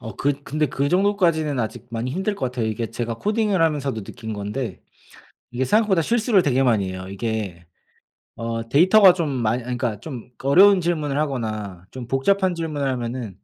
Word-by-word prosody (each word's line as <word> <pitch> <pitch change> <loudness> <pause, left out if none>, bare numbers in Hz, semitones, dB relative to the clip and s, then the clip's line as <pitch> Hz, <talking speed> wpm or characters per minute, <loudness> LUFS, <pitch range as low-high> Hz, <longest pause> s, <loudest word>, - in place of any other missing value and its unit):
어 110 -5 -8
그 145 0 +1
근데 150 +1 -1
그 140 +2 -1
정도까지는 175 -7 +2
아직 115 +2 -5
많이 115 +2 -3
힘들 190 +6 -1
것 130 - -2
같아요. 125 -3 -2
이게 110 +1 -3
제가 115 -1 -3
코딩을 210 - 0
하면서도 140 -8 0
느낀 110 +2 -8
건데 105 0 -4 0.7
이게 125 +2 -1
생각보다 200 - +3
실수를 225 -2 +2
되게 135 -3 +2
많이 105 -7 +2
해요. 95 0 -7
이게 100 -5 -4 0.7
어 115 0 -4
데이터가 185 +4 +6
좀 165 -4 -1
많이 120 -2 -1
아니 125 0 -3
그러니까 115 -5 -2
좀 125 -4 -8
어려운 190 +7 +6
질문을 155 -5 -1
하거나 110 - -3
좀 125 -2 -8
복잡한 185 +8 +1
질문을 155 -4 -3
하면은 120 -5 -4
130 Hz, 385 characters per minute, -22 LUFS, 115-165 Hz, 0.7 s, 데이터가